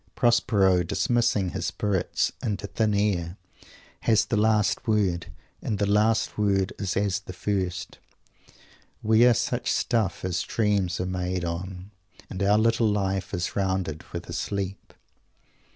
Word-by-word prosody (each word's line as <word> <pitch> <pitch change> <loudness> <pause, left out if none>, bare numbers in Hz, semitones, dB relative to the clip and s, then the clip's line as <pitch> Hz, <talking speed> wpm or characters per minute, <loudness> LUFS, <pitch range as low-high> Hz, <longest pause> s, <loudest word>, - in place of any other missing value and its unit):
Prospero, 105 -6 +3
dismissing 105 +1 +1
his 85 -2 -3
spirits 100 -3 0
"into 105 -2 -2
thin 105 +1 0
air," 95 -4 0 0.6
has 110 -2 +3
the - - -1
last 105 0 +2
word; 95 -6 +1 0.3
and 105 - -2
the 100 - +1
last 105 +2 +2
word 100 -2 +1
is 95 -3 -2
as 100 -1 +1
the 95 -1 -10
first: 90 -2 -3 1.0
"we 110 +2 +5
are 120 - +5
such - - -1
stuff 110 -6 0
as 90 0 -1
dreams 100 -6 0
are 90 - -1
made 90 -1 -2
on, 90 +3 -5 0.4
and 95 - -5
our 100 +1 +4
little 115 0 +3
life 95 -3 -1
is 90 -3 -3
rounded 95 -5 -1
with - - -6
a - - -6
sleep." 100 -1 -4
100 Hz, 140 wpm, -26 LUFS, 90-105 Hz, 1.0 s, we